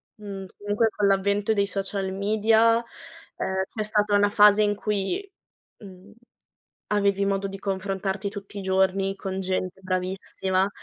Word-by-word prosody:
Mhmm, 200 Hz, -2 st, -7 dB
comunque 205 Hz, +2 st, +1 dB
con 210 Hz, -1 st, -1 dB
l'avvento 200 Hz, +2 st, +2 dB
dei 200 Hz, -1 st, +1 dB
social 195 Hz, 0 st, -3 dB
media, 220 Hz, +3 st, +3 dB, 0.5 s
ehm, 190 Hz, 0 st, -1 dB
c'è 215 Hz, -, -1 dB
stata 210 Hz, -1 st, +1 dB
una 205 Hz, 0 st, +4 dB
fase 210 Hz, 0 st, +6 dB
in 205 Hz, 0 st, +2 dB
cui, 210 Hz, -, -2 dB, 0.5 s
mhmm, 195 Hz, 0 st, -14 dB, 0.8 s
avevi 200 Hz, -1 st, +2 dB
modo 195 Hz, 0 st, 0 dB
di 195 Hz, 0 st, -7 dB
confrontarti 195 Hz, 0 st, -2 dB
tutti 200 Hz, 0 st, -9 dB
i -, -, -4 dB
giorni, 190 Hz, +1 st, +1 dB
con 190 Hz, 0 st, -4 dB
gente 185 Hz, 0 st, -2 dB
bravissima 185 Hz, +1 st, -1 dB
200 Hz, 140 wpm, -25 LUFS, 190-210 Hz, 0.8 s, fase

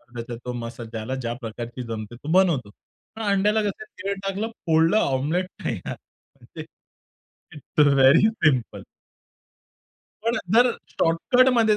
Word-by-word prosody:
त्याच्यात 120 Hz, 0 st, -6 dB
तो 125 Hz, -, -3 dB
मसाला. 115 Hz, -1 st, -7 dB
ज्याला 115 Hz, +3 st, -4 dB
ज्या 120 Hz, -3 st, -3 dB
प्रकारची 120 Hz, +2 st, -6 dB
जमते 110 Hz, 0 st, -6 dB
तो 145 Hz, +6 st, -6 dB
बनवतो. 170 Hz, -, +3 dB, 0.5 s
पण 225 Hz, -, -7 dB
अंड्याला 210 Hz, +1 st, +2 dB
कसं 205 Hz, +1 st, -3 dB, 0.2 s
तेल 200 Hz, 0 st, -1 dB
टाकलं, 195 Hz, +3 st, -2 dB, 0.2 s
फोडलं 165 Hz, +4 st, +4 dB
ऑमलेट 155 Hz, +4 st, 0 dB, 0.2 s
तयार. -, -, -3 dB, 0.6 s
ते -, -, -5 dB, 0.9 s
इट्स 150 Hz, 0 st, +1 dB
व्हेरी 140 Hz, +8 st, +6 dB
सिंपल. 155 Hz, -, 0 dB, 1.4 s
पण 230 Hz, +2 st, +1 dB, 0.2 s
जर 245 Hz, +2 st, +6 dB, 0.2 s
शॉर्टकटमध्ये 230 Hz, +6 st, +3 dB
160 Hz, 120 wpm, -24 LUFS, -, 1.4 s, व्हेरी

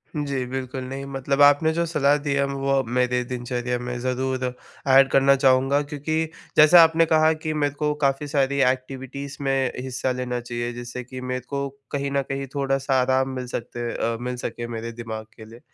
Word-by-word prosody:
जी, 140 Hz, -3 st, -2 dB
बिल्कुल 130 Hz, 0 st, -5 dB
नहीं 135 Hz, +1 st, -5 dB
मतलब 135 Hz, +1 st, -1 dB
आपने 145 Hz, +3 st, +6 dB
जो 170 Hz, +1 st, 0 dB
सलाह 145 Hz, -3 st, +2 dB
दी 140 Hz, -, +1 dB
है, 140 Hz, 0 st, +2 dB
वो 140 Hz, 0 st, -3 dB
अब 135 Hz, -, -3 dB
मेरे 125 Hz, 0 st, +2 dB
दिनचर्या 125 Hz, 0 st, -3 dB
में 125 Hz, 0 st, -4 dB
ज़रूर 130 Hz, +1 st, -2 dB, 0.5 s
एड 135 Hz, 0 st, +7 dB
करना 135 Hz, 0 st, +5 dB
चाहूँगा 135 Hz, +1 st, +3 dB
क्योंकि 150 Hz, +2 st, -3 dB, 0.4 s
जैसे 155 Hz, +3 st, +8 dB
आपने 165 Hz, 0 st, +6 dB
कहा 155 Hz, 0 st, +5 dB
कि 155 Hz, -, 0 dB
मेरे 145 Hz, -1 st, +1 dB
को 150 Hz, 0 st, -1 dB
काफ़ी 135 Hz, +1 st, +1 dB
सारी 140 Hz, -1 st, +1 dB
एक्टिविटीज़ 135 Hz, +2 st, -7 dB
में 135 Hz, -2 st, +1 dB
हिस्सा 130 Hz, 0 st, -2 dB
लेना 125 Hz, -1 st, -3 dB
चाहिए, 120 Hz, 0 st, -4 dB
जिससे 120 Hz, +1 st, -7 dB
कि 130 Hz, +1 st, -9 dB
मेरे 125 Hz, 0 st, -3 dB
को 140 Hz, 0 st, -2 dB, 0.2 s
कहीं 140 Hz, 0 st, -2 dB
न 140 Hz, 0 st, +1 dB
कहीं 135 Hz, 0 st, -3 dB
थोड़ा-सा 135 Hz, -1 st, +1 dB
आराम 130 Hz, +1 st, +1 dB
मिल 125 Hz, -1 st, -5 dB
सकते 120 Hz, 0 st, -4 dB
अ, 115 Hz, 0 st, -1 dB
मिल 125 Hz, 0 st, -3 dB
सके 120 Hz, -1 st, -5 dB
मेरे 115 Hz, +1 st, -5 dB
दिमाग 110 Hz, -2 st, -6 dB
के 110 Hz, -, -11 dB
लिए। 115 Hz, +2 st, -13 dB
135 Hz, 190 wpm, -24 LUFS, 125-140 Hz, 0.5 s, जैसे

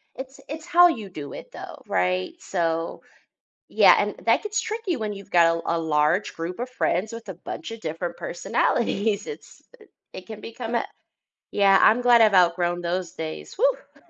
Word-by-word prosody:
it's 265 Hz, +1 st, -9 dB
it's 315 Hz, +2 st, -6 dB
how 350 Hz, +1 st, +6 dB
you 220 Hz, -, -3 dB
do 150 Hz, -5 st, -8 dB
it, -, -, -10 dB
though. -, -, -10 dB
Right? 90 Hz, 0 st, 0 dB
So, 165 Hz, -2 st, -2 dB, 0.7 s
yeah, -, -, +6 dB
and -, -, -1 dB
that -, -, +3 dB
gets 420 Hz, 0 st, -1 dB
tricky 435 Hz, -6 st, -3 dB
when 215 Hz, -3 st, -3 dB
you've 200 Hz, 0 st, -12 dB
got 165 Hz, -1 st, +4 dB
a -, -, -5 dB, 0.2 s
a -, -, -2 dB
large 160 Hz, +4 st, +1 dB
group 170 Hz, +5 st, -5 dB
of 250 Hz, -, -4 dB
friends 220 Hz, -3 st, -1 dB
with 230 Hz, -3 st, -9 dB
a 185 Hz, -, -6 dB
buncha 225 Hz, +5 st, -7 dB
different 165 Hz, 0 st, -5 dB
personalities, 210 Hz, +3 st, -1 dB
it's 450 Hz, -, -10 dB, 0.5 s
it 185 Hz, -, -9 dB
can 215 Hz, -1 st, -9 dB
become 230 Hz, +1 st, -6 dB
a -, -, 0 dB, 0.7 s
Yeah, 195 Hz, -1 st, +4 dB
I'm 230 Hz, +3 st, +5 dB
glad 240 Hz, -1 st, +6 dB
I've 215 Hz, -2 st, +5 dB
outgrown 175 Hz, 0 st, +3 dB
those 175 Hz, 0 st, -3 dB
days, 160 Hz, -1 st, -7 dB
woah. -, -, -2 dB
195 Hz, 175 wpm, -24 LUFS, 170-240 Hz, 0.7 s, how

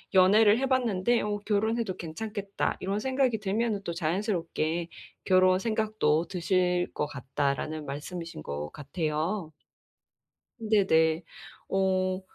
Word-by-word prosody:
연애를 205 Hz, +3 st, +6 dB
해 265 Hz, -, 0 dB
봤는데 240 Hz, -3 st, +2 dB
'어, 205 Hz, 0 st, -1 dB
결혼해도 220 Hz, -1 st, 0 dB
괜찮겠다.' 200 Hz, +4 st, -3 dB
이런 200 Hz, +2 st, -2 dB
생각이 260 Hz, -2 st, +1 dB
들면은 210 Hz, +1 st, -1 dB
또 170 Hz, -, -3 dB
자연스럽게 170 Hz, -2 st, -1 dB, 0.4 s
결혼 185 Hz, 0 st, +4 dB
생각도 215 Hz, -7 st, +1 dB
드실 180 Hz, 0 st, +1 dB
것 150 Hz, -, 0 dB
같다."라는 140 Hz, +2 st, -2 dB
말씀이신 160 Hz, -, -6 dB
것 75 Hz, 0 st, -5 dB
같아요. 155 Hz, +4 st, -2 dB, 1.1 s
네네. 175 Hz, -7 st, +3 dB, 0.5 s
어 185 Hz, -1 st, +1 dB
185 Hz, 260 characters per minute, -28 LUFS, 160-215 Hz, 1.1 s, 연애를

